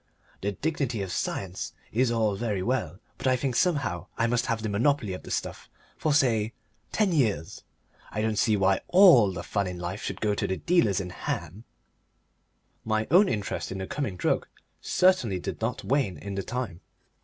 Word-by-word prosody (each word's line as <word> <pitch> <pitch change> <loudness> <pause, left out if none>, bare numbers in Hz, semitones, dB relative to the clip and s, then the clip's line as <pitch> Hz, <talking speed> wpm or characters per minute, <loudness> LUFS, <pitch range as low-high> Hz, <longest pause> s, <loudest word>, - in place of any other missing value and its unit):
The 100 +1 -1
dignity 130 - -2
of 95 - -5
science 95 +1 -3 0.2
is 125 +3 +2
all 110 -3 +1
very 105 -3 -2
well, 105 -8 -1 0.2
but - - -2
I 130 - +4
think 130 -1 -2
somehow 140 - 0
I 115 - +2
must 120 0 +1
have 115 -2 -1
the - - -1
monopoly 110 0 +1
of 90 - -6
the - - -11
stuff - - -4 0.3
for, 155 - 0
say, 115 -6 +2 0.4
ten 210 -3 +2
years. 105 - 0 0.5
I 105 - -2
don't 110 -1 0
see 110 -2 +3
why 95 0 +2
ALL 175 - +7
the 85 -1 -6
fun 100 -1 -1
in 90 -1 -5
life 90 +4 -5
should - - -4
go 105 -1 +1
to - - -1
the 95 - -1
dealers 165 - +2
in 90 -2 -5
ham." 100 +4 -5 1.2
My 110 0 0
own 190 +4 +6
interest 105 -4 -3
in 95 - -4
the 95 - -4
coming 120 -4 -3
drug - - 0 0.3
certainly 180 - +3
did - - -5
not 115 +2 -2
wane 130 -9 0
in 100 0 -6
the 100 - -2
time. 120 -6 -4
110 Hz, 190 wpm, -27 LUFS, 95-130 Hz, 1.2 s, ALL